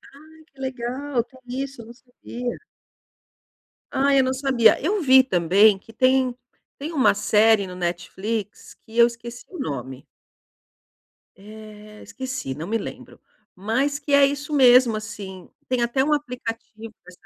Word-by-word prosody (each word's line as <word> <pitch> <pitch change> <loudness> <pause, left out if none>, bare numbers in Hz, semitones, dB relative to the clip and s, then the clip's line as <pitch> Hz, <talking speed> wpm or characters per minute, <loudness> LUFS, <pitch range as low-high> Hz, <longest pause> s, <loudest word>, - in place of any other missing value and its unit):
Ai, 315 +2 -17
que 275 -3 -26
legal, 260 0 -3
tem 260 +2 -21 0.2
isso, 275 -3 -7
eu - - -12
não 235 - -11
sabia. 245 0 -7 1.3
Ai, 275 0 +3
eu - - +4
não 260 0 0
sabia. 260 -4 +3
Eu 390 +6 0
vi 265 -3 +6
também 195 0 +4
que 225 +3 -17
tem 255 +1 +2 0.4
tem 295 +4 -5
uma 280 -5 +3
série 210 0 +3
no 180 - -9
Netflix 190 +4 -4
que 225 +1 -11
eu 235 0 +7
esqueci 235 0 -9
o 360 - -10
nome. 130 - -5 1.3
Eh, 210 +1 -13
esqueci. 255 - -5
Não 155 +5 -7
me 225 +3 0
lembro. - - -9 0.4
Mas 260 +9 -1
que 285 0 -4
é 280 0 +7
isso 285 +2 -3
mesmo, 250 -4 +6
assim. 195 -3 -8 0.2
Tem 255 -1 0
até 240 +3 +1
um 300 +2 +1
aplicativo 230 -5 -6
dessa 180 0 -16
240 Hz, 150 wpm, -23 LUFS, 210-270 Hz, 1.3 s, eu